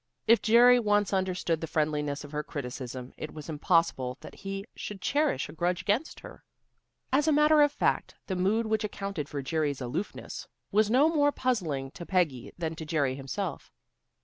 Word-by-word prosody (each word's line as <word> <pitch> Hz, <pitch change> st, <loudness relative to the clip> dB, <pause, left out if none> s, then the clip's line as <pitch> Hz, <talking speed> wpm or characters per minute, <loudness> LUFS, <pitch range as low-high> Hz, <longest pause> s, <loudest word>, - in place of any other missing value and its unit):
If 230 Hz, +1 st, +5 dB
Jerry 245 Hz, +2 st, +7 dB
once 205 Hz, -3 st, +2 dB
understood 185 Hz, -4 st, 0 dB
the 165 Hz, -, -3 dB
friendliness 150 Hz, -2 st, -1 dB
of 145 Hz, -, -10 dB
her 150 Hz, 0 st, -2 dB
criticism, 125 Hz, -3 st, -6 dB
it 155 Hz, -, -7 dB
was 155 Hz, +1 st, -8 dB
impossible 150 Hz, -5 st, +1 dB
that -, -, -10 dB
he 195 Hz, 0 st, -6 dB
should 205 Hz, -2 st, -6 dB
cherish 290 Hz, +8 st, +1 dB
a -, -, -10 dB
grudge 175 Hz, +1 st, -1 dB
against 215 Hz, -, -1 dB
her. -, -, -12 dB, 0.7 s
As 290 Hz, +3 st, +3 dB
a -, -, +5 dB
matter 300 Hz, +1 st, +5 dB
of 290 Hz, -1 st, +5 dB
fact, -, -, 0 dB
the 190 Hz, -, -3 dB
mood 200 Hz, +5 st, +1 dB
which 220 Hz, 0 st, 0 dB
accounted 195 Hz, -7 st, -4 dB
for 140 Hz, -2 st, -4 dB
Jerry's 145 Hz, -1 st, -1 dB
aloofness 145 Hz, +11 st, -5 dB, 0.2 s
was 210 Hz, +1 st, +3 dB
no 260 Hz, +6 st, +5 dB
more 290 Hz, -3 st, +3 dB
puzzling 165 Hz, -, -1 dB
to 170 Hz, -, -9 dB
Peggy 165 Hz, -10 st, 0 dB
than 165 Hz, -2 st, -3 dB
to 160 Hz, -, -5 dB
Jerry 150 Hz, -4 st, 0 dB
himself. 135 Hz, -1 st, -5 dB
180 Hz, 175 wpm, -29 LUFS, 150-220 Hz, 0.7 s, Jerry